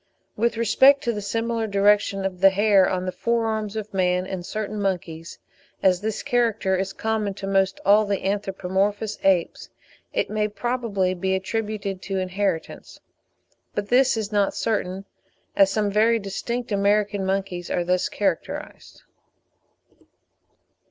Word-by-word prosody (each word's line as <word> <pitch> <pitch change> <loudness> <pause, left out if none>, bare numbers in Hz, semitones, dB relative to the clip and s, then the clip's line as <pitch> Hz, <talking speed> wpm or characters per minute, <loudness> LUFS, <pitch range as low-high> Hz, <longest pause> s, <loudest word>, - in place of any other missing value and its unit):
With 230 +1 0
respect 265 +5 +5
to 235 - 0
the 210 - -4
similar 230 +2 -2
direction 200 -1 +2
of 185 -2 -3
the 195 - +8
hair 200 0 +4
on 185 0 -2
the 185 - -2
fore 230 +5 0
arms 215 -1 -2
of 215 -1 -5
man 180 -1 +1
and 190 -2 -5
certain 215 +2 -4
monkeys, 170 -4 -3 0.5
as 185 -1 +3
this 215 0 -3
character 230 -6 +1
is 190 +1 -2
common 215 -2 -2
to 195 - -6
almost 195 -1 +1
all 210 +2 +5
the 200 -2 -2
anthropomorphous 200 +1 -1
apes, 185 -3 +1 0.4
it - - 0
may 210 0 0
probably 215 -4 -1
be 190 +1 -1
attributed 205 -1 -3
to 195 -1 -3
inheritance; 185 -2 -3 0.8
but 205 0 -3
this 255 -1 +4
is 215 -1 -3
not 205 -2 +1
certain, 195 -3 -2 0.5
as 195 -1 +5
some 205 0 0
very 225 +3 +3
distinct 230 +4 -4
American 205 0 +1
monkeys 190 -2 -2
are 175 - 0
thus 180 +1 0
characterised. 190 -5 -4
200 Hz, 145 wpm, -23 LUFS, 190-215 Hz, 0.8 s, the